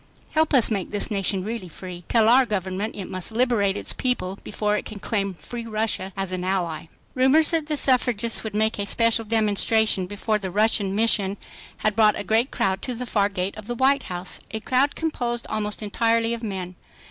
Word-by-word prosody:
HELP 315 -1 +2
US 240 -3 +5
MAKE 195 -4 -1
THIS 205 +1 0
NATION 195 -2 0
REALLY 215 -3 -5
FREE. 180 +1 -9
TELL 225 -2 +4
OUR 250 +2 +6
GOVERNMENT 195 0 -2
IT 195 - -5
MUST 185 +4 -2
LIBERATE 220 -5 +2
ITS - - -3
PEOPLE 200 -7 -2
BEFORE 210 0 -1
IT - - -5
CAN 215 - -8
CLAIM 200 -2 -1
FREE 235 +6 -7
RUSSIA 215 -3 -2
AS 195 -1 -2
AN 180 -1 -3
ALLY. 175 -4 -2 0.2
Rumors 270 +5 +4
that 325 -3 0
the 305 -1 -1
suffragists 245 -4 +2
would 215 -2 -5
make 220 0 +1
a 200 - -2
special 230 +1 +2
demonstration 215 -2 +2
before 210 +2 -1
the 190 -2 -4
Russian 205 0 +1
Mission 205 -3 +2 0.4
had 215 -1 +1
brought 215 -2 +4
a - - -3
great 225 +5 +2
crowd 190 0 -1
to 250 - -3
the 250 +2 -5
far 205 -4 +1
gate 190 -1 -3
of 215 - -10
the 240 - -3
White 270 +3 +3
House; 180 0 -2
a 220 - -4
crowd 260 +5 +1
composed 240 -7 -2
almost 210 0 -2
entirely 230 +2 +1
of 235 - -5
men. 190 -5 -4
215 Hz, 200 wpm, -24 LUFS, 195-235 Hz, 0.4 s, OUR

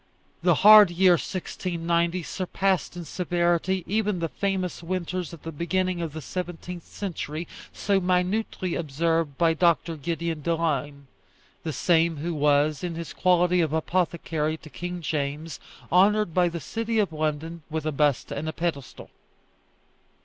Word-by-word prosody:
The - - +4
hard 210 -2 +10
year 180 +1 +4
1690 170 -1 -1
surpassed 185 0 -1
in 175 - -6
severity 175 +1 0
even 210 -1 0
the 165 -1 -2
famous 185 +5 -2
winters 180 0 -3
at 170 -3 -11
the 165 - -5
beginning 180 +3 -1
of 165 -3 -4
the 155 -1 -7
seventeenth 175 +1 -6
century, 170 -4 -5 0.2
so 200 -2 +1
minutely 185 0 0
observed 165 -1 -1
by 165 -1 +3
Dr. 165 0 +2
Gideon 165 +1 -3
Delane 145 -3 -1 0.6
the 160 - -3
same 165 0 +2
who 165 +4 -3
was, 150 +1 +2
in 175 -2 -3
his 170 0 -6
quality 180 -1 +3
of 160 -2 0
apothecary 160 -2 -1
to 155 - -12
King 175 0 -5
James, 150 +1 -3 0.3
honoured 200 +1 +4
by 180 0 +3
the 170 0 -5
city 225 - -3
of 200 -6 +1
London 155 +2 -3
with 155 -1 -3
a 155 - 0
bust 145 -2 +1
and 155 +3 -3
a - - -4
pedestal. 160 -6 -4
170 Hz, 145 wpm, -26 LUFS, 155-180 Hz, 0.6 s, hard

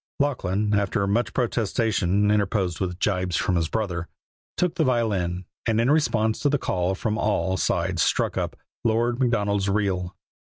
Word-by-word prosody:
Lachlan, 105 -7 0
after 100 0 +1
much 110 +3 0
protestation, 105 -4 +1
interposed 100 -4 0
with 90 -2 -2
gibes 90 -3 0
from 90 - +1
his 80 -2 0
brother, 90 -6 -2 0.5
took 180 -2 +1
the 170 - +1
violin, 100 - 0 0.2
and 115 -1 +2
in 120 +4 +3
response 110 -8 +2
to 145 - +2
the 145 - +2
call 95 -6 -1
from 110 +3 -2
all 100 -3 +1
sides 90 -1 0
struck - - +1
up - - -2 0.3
"Lord 120 +2 +1
Macdonald's 100 -5 +1
Reel." 95 -3 -1
105 Hz, 155 wpm, -24 LUFS, 95-115 Hz, 0.5 s, in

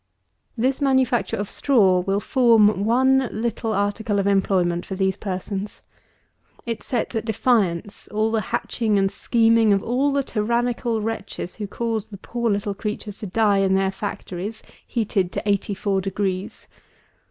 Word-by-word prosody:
This 260 +4 0
manufacture 260 -3 +2
of 205 - -3
Straw 200 -10 +3
will 195 +2 0
form 215 -5 +4
one 260 +2 +3
little 225 +1 -2
article 205 +1 0
of 200 - +1
employment 185 -3 +2
for 190 - -6
these 190 0 +1
persons. 195 +1 -5 0.8
It 230 -2 -3
sets 245 -2 -2
at 225 - -1
defiance 215 -5 0
all 215 +1 0
the 225 -1 +1
hatching 220 -3 0
and 195 0 +2
scheming 230 -2 +3
of 195 - +1
all 265 +4 +1
the 280 0 +1
tyrannical 235 0 -1
wretches 210 -4 -5
who 210 -2 -4
cause 225 0 -3
the 200 - -10
poor 235 +4 -2
little 205 0 -1
creatures 210 0 -5
to 210 - -5
die 205 +1 +2
in 190 -1 +2
their 190 0 +1
factories, 195 +1 -6 0.2
heated 200 -5 0
to - - -4
eighty 200 0 0
four 195 0 0
degrees. 190 0 -3
210 Hz, 155 wpm, -23 LUFS, 195-230 Hz, 0.8 s, form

